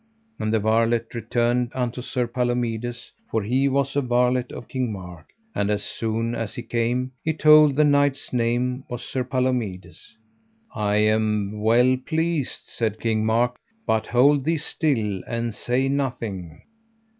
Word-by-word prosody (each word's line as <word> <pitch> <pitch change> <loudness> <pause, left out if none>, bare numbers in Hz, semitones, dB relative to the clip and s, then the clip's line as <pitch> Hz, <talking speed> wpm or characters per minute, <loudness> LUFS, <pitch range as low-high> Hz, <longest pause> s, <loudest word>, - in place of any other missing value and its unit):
And 110 - -1
the 110 - +3
varlet 115 +2 +1
returned 120 +1 0
unto 125 -1 -2
Sir 125 0 -1
Palomides, 120 -1 -2 0.2
for 110 - -1
he 130 +6 +2
was 135 0 0
a 145 - +3
varlet 125 0 +1
of - - -8
King 130 -3 -2
Mark. 90 -5 -9 0.3
And 100 - 0
as 105 -1 0
soon 115 +2 -2
as 115 -3 -4
he 120 - -5
came, 120 +2 -1
he 160 -1 0
told 155 -2 +6
the 150 - +4
knight's 145 -2 +2
name 125 +2 0
was 120 -1 -5
Sir 130 - -2
Palomides. 125 -7 -3 0.6
I 105 -1 0
am 105 -1 +1
well 120 +4 +4
pleased, 160 -3 -1
said 110 -2 -2
King 110 -1 0
Mark, 120 +2 +1 0.3
but 110 -1 0
hold 135 +3 +4
thee 165 +3 +1
still 120 - -1
and 115 -1 -2
say 125 +5 0
nothing. 115 - -3
120 Hz, 150 wpm, -24 LUFS, 110-130 Hz, 0.6 s, told